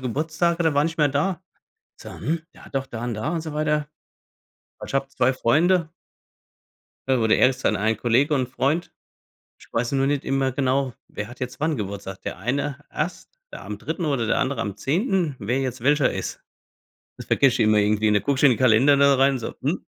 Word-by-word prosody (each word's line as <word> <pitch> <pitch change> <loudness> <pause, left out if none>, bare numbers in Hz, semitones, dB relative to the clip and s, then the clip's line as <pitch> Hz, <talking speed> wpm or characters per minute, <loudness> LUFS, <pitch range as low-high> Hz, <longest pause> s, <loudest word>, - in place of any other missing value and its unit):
Geburtstage 155 +6 -1
und 175 - 0
der 160 -3 +2
war 145 +1 +3
nicht 165 0 -3
mehr 150 - +4
da. 155 +5 -1 0.6
So: - - -10
„Hm, 160 +1 -3 0.3
doch 135 0 -2
da 120 -1 -6
und 120 - -2
da“ 110 +9 -3
und 165 - -1
so 155 -1 -6
weiter. 150 -1 0 0.9
Also, - - -7
ich - - -8
habe 135 0 0
2 130 -1 +1
Freunde. 160 +7 +2 1.2
Da 130 -2 +3
wurde 110 -1 +3
erst 130 0 +2
dann - - +2
ein 110 +2 +1
Kollege 125 +7 +2
und 130 -2 0
Freund. 145 +7 -1 0.7
Ich - - -19
weiß 120 +3 -1
nur 135 0 +2
nicht 145 0 0
immer 135 -1 0
genau: 130 -1 0 0.2
„Wer 105 +1 -6
hat 120 - -13
jetzt 125 +2 -5
wann 155 -4 0
Geburtstag?“ 100 -1 -6
Der - - -4
eine 140 +7 -2
erst, 180 - -4 0.2
ja, - - -9
am - - -6
3. 175 - -4
oder 135 -6 0
der - - +1
andere 135 +2 -1
am 100 -2 -4
10.. 170 - 0
Wer 120 +5 -1
jetzt 130 -2 -3
welcher 140 +1 +3
ist, - - -5 0.8
das - - -10
vergesse 135 -3 +3
ich 110 - +4
immer 110 0 +4
irgendwie 105 +1 +2
und 105 - +3
dann - - +1
gucke 140 -2 0
ich - - -1
in 140 - +8
den 120 - 0
Kalender 130 +3 +5
da 140 0 +5
rein, 135 0 +3
so: 115 - -6
„Hm?“ - - -2
135 Hz, 215 wpm, -23 LUFS, 120-150 Hz, 1.2 s, in